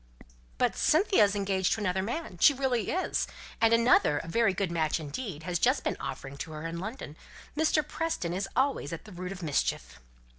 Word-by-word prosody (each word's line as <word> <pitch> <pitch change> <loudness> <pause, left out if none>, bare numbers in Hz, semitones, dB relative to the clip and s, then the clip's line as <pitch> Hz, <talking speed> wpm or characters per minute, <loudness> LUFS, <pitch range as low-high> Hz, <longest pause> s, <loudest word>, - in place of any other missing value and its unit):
"But - - +1
Cynthia 370 - +4
is 200 0 -1
engaged 195 -2 +1
to - - -3
another 190 -2 0
man 225 - -4
she 285 - +6
really 255 -4 0
is. 370 - 0 0.3
And 225 0 +5
another 230 -9 +4
a - - -5
very 225 +4 +2
good 190 -1 -2
match 160 -1 0
indeed 160 - -6
has 175 0 -1
just - - +2
been - - -1
offering 135 +1 -6
to 155 - -6
her 155 +1 -6
in 165 0 -4
London. 205 - -6 0.4
Mr. 310 0 +2
Preston 310 - -2
is 195 +2 -3
always 260 - +1
at 165 +5 -7
the 215 - -12
root 180 0 -6
of 190 -2 -7
mischief." 65 - -1
195 Hz, 195 wpm, -29 LUFS, 165-245 Hz, 0.4 s, she